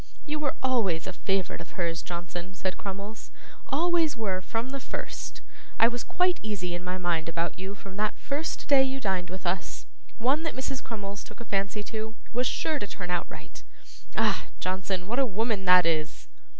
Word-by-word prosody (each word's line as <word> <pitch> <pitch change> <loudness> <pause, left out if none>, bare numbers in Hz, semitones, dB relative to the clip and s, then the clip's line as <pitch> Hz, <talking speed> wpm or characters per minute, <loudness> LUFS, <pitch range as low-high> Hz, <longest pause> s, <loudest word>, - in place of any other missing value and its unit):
'You 305 0 -1
were 290 -3 0
always 215 -11 +3
a 190 - -3
favourite 195 -2 0
of 170 - -10
hers, 170 -2 0
Johnson,' 175 +1 -5
said 185 0 -1
Crummles, 200 +2 -6 0.4
'always 320 0 +3
were 195 -5 0
from 230 +7 -2
the 275 - -2
first. - - -5 0.4
I 225 - +8
was 240 0 -1
quite 360 0 +3
easy 190 -5 -2
in 175 +1 -3
my 180 0 -1
mind 170 -3 +1
about 170 +3 -1
you 190 +2 -4
from 195 -1 -9
that 215 +1 +1
first 290 +3 -2
day 275 -1 +8
you 265 0 +1
dined 190 -6 0
with 185 +1 -6
us. 175 +1 -1 0.3
One 265 +7 +3
that 320 -1 -2
Mrs. 265 0 -2
Crummles 205 -3 -5
took - - -12
a 235 - -7
fancy 200 +1 0
to, 220 0 -4 0.2
was 245 +1 +3
sure 315 -2 +1
to 205 - -3
turn 180 -3 -4
out 175 - 0
right. - - -10 0.5
Ah! - - +3
Johnson, 185 0 -1
what 235 +7 0
a 270 - +6
woman 215 -1 0
that 180 -1 +8
is! 155 -2 0
200 Hz, 190 wpm, -29 LUFS, 180-250 Hz, 0.5 s, I